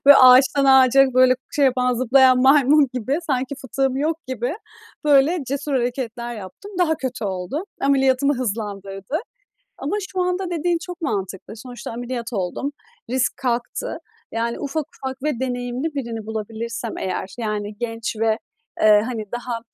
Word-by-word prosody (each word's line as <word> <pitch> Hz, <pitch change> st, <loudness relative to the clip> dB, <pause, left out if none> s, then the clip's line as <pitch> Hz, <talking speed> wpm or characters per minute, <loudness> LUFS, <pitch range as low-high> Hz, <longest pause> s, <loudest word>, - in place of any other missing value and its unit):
böyle, 285 Hz, -, +10 dB
ağaçtan 260 Hz, +2 st, +7 dB
ağaca, 265 Hz, 0 st, +6 dB
böyle, 255 Hz, 0 st, +6 dB, 0.2 s
şey 285 Hz, -, +4 dB
yapan, 250 Hz, -1 st, +2 dB
zıplayan 255 Hz, +1 st, +5 dB
maymun 280 Hz, +1 st, +5 dB
gibi, 260 Hz, +5 st, -1 dB
sanki 265 Hz, -1 st, -1 dB
fıtığım 265 Hz, 0 st, -1 dB
yok 310 Hz, +3 st, 0 dB
gibi, 255 Hz, +3 st, -2 dB, 0.5 s
böyle, 295 Hz, +4 st, +4 dB
cesur 280 Hz, +2 st, -3 dB
hareketler 240 Hz, -1 st, -2 dB
yaptım. 210 Hz, -, -10 dB
Daha 325 Hz, -3 st, +3 dB
kötü 255 Hz, -4 st, -4 dB
oldu. 190 Hz, -, -3 dB, 0.2 s
Ameliyatımı 275 Hz, 0 st, +3 dB
hızlandırdı. 200 Hz, 0 st, -4 dB, 0.6 s
Ama 415 Hz, -, -2 dB
şu 370 Hz, -1 st, -1 dB
anda 360 Hz, 0 st, -1 dB
dediğin 345 Hz, +1 st, +1 dB
çok 360 Hz, 0 st, -8 dB
mantıklı. 195 Hz, -, -4 dB
Sonuçta 245 Hz, 0 st, -8 dB
ameliyat 240 Hz, 0 st, -5 dB
oldum, 195 Hz, +9 st, -2 dB, 0.4 s
risk 255 Hz, 0 st, 0 dB
kalktı. 250 Hz, -, -2 dB, 0.3 s
Yani, 235 Hz, +1 st, -2 dB
ufak 290 Hz, +1 st, -2 dB
ufak 265 Hz, 0 st, -6 dB
ve 300 Hz, -6 st, -1 dB
deneyimli 250 Hz, +4 st, -3 dB
birini 230 Hz, -5 st, -4 dB
bulabilirsem 220 Hz, +1 st, -5 dB
eğer 185 Hz, 0 st, -4 dB
yani, 210 Hz, -2 st, -3 dB
genç 225 Hz, -1 st, -4 dB
ve, 220 Hz, -1 st, +2 dB, 0.4 s
eee, 210 Hz, -1 st, +6 dB
hani, 230 Hz, -4 st, -4 dB
daha 240 Hz, -1 st, -3 dB
255 Hz, 145 wpm, -22 LUFS, 230-275 Hz, 0.6 s, böyle